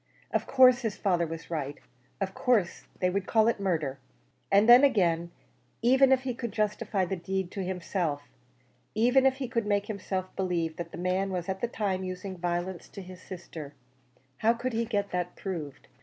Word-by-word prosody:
Of - - 0
course 255 -1 +6
his 225 -4 -2
father 175 -4 +1
was 165 +1 -8
right; 145 -3 -3 0.4
of 190 -1 -2
course 220 -8 +1
they 180 0 +2
would 195 0 -2
call 220 -1 +4
it 230 - +1
murder. 155 -8 -1 0.5
And 200 +3 +5
then 245 +3 +9
again, 175 -10 +3 0.5
even 265 +2 +5
if 260 -1 +4
he 255 -1 -2
could 235 -1 -5
justify 210 -2 0
the 190 - -2
deed 190 +1 -3
to 195 - -4
himself 175 -5 -2 0.7
even 250 +4 +4
if 265 - +2
he 265 -1 -4
could 230 -2 -1
make 205 -1 +1
himself 190 -3 -4
believe 170 -4 -1
that 170 -1 -6
the - - -8
man 185 +2 0
was 180 -2 -3
at 190 0 -3
the 240 - +1
time 195 -5 -2
using 185 +1 -5
violence 175 +1 -3
to 195 - -9
his 185 0 -11
sister 165 -6 -9 0.6
how 225 +1 +3
could 255 +1 -3
he 230 +1 0
get 205 -3 -1
that 180 -1 -2
proved? 160 -8 -6
190 Hz, 185 wpm, -29 LUFS, 175-225 Hz, 0.7 s, then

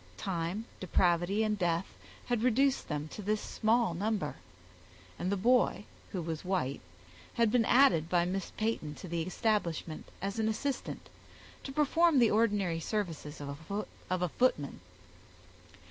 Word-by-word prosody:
Time, 180 - -2
depravity, 180 +3 +2
and 210 -1 0
death 170 0 +1 0.4
had 240 -3 0
reduced 260 +3 +2
them 150 0 -3
to 210 - -7
this 210 +1 0
small 220 -3 +1
number; 200 -3 -1 0.8
and 185 - -1
the 200 - +1
boy, 240 0 +3 0.3
who 180 -3 -3
was 160 -1 -4
white, 180 -8 -1 0.5
had 230 -3 +3
been 235 -1 +3
added 175 - +5
by 175 -1 +3
Miss 190 +1 -2
Peyton 215 -9 -1
to 185 - -9
the 170 0 -2
establishment, 175 -4 -1
as 200 +3 -3
an 220 0 +2
assistant, 270 +5 -3 0.6
to 270 - -6
perform 305 +2 +3
the 235 -3 +5
ordinary 205 -6 +2
services 165 -6 -3
of 140 0 -6 0.5
a 180 -1 0
footman. 150 - +1
195 Hz, 140 wpm, -32 LUFS, 170-225 Hz, 0.8 s, added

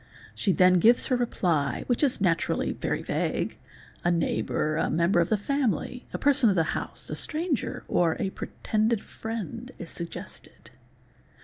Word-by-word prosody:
She 200 - +1
then 180 0 +5
gives 235 +7 +5
her 255 - +1
reply, 175 - 0
which 245 - 0
is 280 -4 +2
naturally 175 -4 +1
very - - -2
vague, - - -2 0.4
a 175 - +3
neighbour, 160 -2 0
a 160 - +1
member 170 +3 +2
of 170 - +2
the 215 - +3
family, 250 - -1
a - - -3
person 280 -5 +4
of 195 - +2
the 165 - +3
house, - - -4
a - - -2
stranger, 310 - -2
or 165 -2 +2
a 190 - -1
pretended 215 +2 -1
| - - -17 0.2
friend 230 +2 -5
is 170 - -8
suggested. 170 -1 -9
205 Hz, 165 wpm, -27 LUFS, 170-245 Hz, 0.4 s, then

